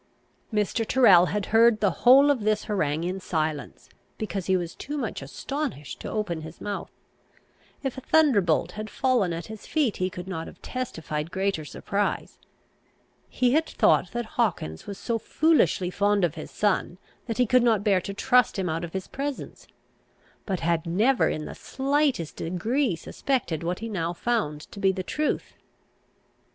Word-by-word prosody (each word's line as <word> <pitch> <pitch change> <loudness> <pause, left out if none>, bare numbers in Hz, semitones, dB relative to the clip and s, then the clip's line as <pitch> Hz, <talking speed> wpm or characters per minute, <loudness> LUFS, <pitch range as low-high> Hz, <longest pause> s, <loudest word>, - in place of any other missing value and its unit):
Mr. 210 +2 0
Tyrrel 200 -8 +6
had 205 0 -2
heard 230 -1 +6
the 200 -2 +3
whole 275 +4 +7
of 275 - +1
this 215 0 +1
harangue 160 -7 -1
in 185 +2 -2
silence, 155 -6 -3 0.3
because 200 -4 -4
he 190 -1 +3
was 175 -2 -4
too 295 +2 -6
much 235 - -3
astonished 150 - -5
to - - -6
open 190 -7 -2
his 160 +1 -10
mouth. 205 -1 -4 0.9
If 265 -1 -3
a - - -14
thunderbolt 205 - +3
had 215 +3 -6
fallen 245 -9 +1
at 165 0 -4
his 220 -1 -10
feet, 290 -9 +1
he 185 0 0
could 180 0 -8
not 175 -4 -4
have - - -12
testified 160 -11 -4
greater 190 -3 -1
surprise. 200 +6 -3 0.9
He 250 -1 +2
had 320 +2 +2
thought - - +3
that 240 0 -2 0.2
Hawkins 80 - -2
was 200 - -6
so 230 +1 -2
foolishly 285 - +2
fond 205 0 +2
of 170 -4 +2
his 155 - -8
son, 200 -3 0 0.3
that 230 - -3
he 250 - +4
could 250 +2 +4
not 225 -4 +3
bear 195 -3 +3
to 200 - -5
trust 250 +1 +3
him 190 -2 -1
out 165 +1 -2
of 170 - -6
his 190 -1 -3
presence; 280 0 -5 0.8
but 190 -4 -2
had 165 0 0
never 220 +10 +3
in 155 - -3
the - - -7
slightest 275 - -1
degree 215 - 0
suspected 175 - -2
what 175 +2 -2
he 225 - -5
now 175 -6 -2
found 175 -8 -1
to - - -9
be 195 -1 +4
the 190 -1 -4
truth. 300 +10 -2
200 Hz, 170 wpm, -26 LUFS, 170-245 Hz, 0.9 s, whole